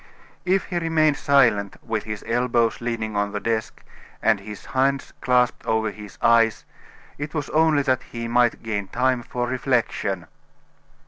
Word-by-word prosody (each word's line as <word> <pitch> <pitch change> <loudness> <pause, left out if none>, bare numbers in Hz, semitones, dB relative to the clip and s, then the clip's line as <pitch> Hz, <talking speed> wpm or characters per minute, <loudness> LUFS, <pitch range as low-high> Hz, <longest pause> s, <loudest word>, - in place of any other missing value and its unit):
If 190 +1 +2
he 175 - -3
remained 155 -3 +2
silent, 115 -8 +3
with 110 -2 -3
his 110 -1 -5
elbows 120 -1 +1
leaning 115 -3 -3
on 100 0 0
the 105 - -2
desk, 110 0 -3 0.4
and 110 -2 +2
his 105 0 -9
hands 135 +1 0
clasped 125 -1 +2
over 110 -1 +1
his 105 -1 -11
eyes, 115 -2 +4 0.5
it 145 +2 -5
was 150 - -3
only 155 -2 +3
that 130 -2 +1
he 115 0 -4
might 120 0 +2
gain 105 -3 -3
time 125 +2 +1
for 120 +1 -3
reflection. 120 -7 -1
120 Hz, 150 wpm, -23 LUFS, 110-135 Hz, 0.5 s, eyes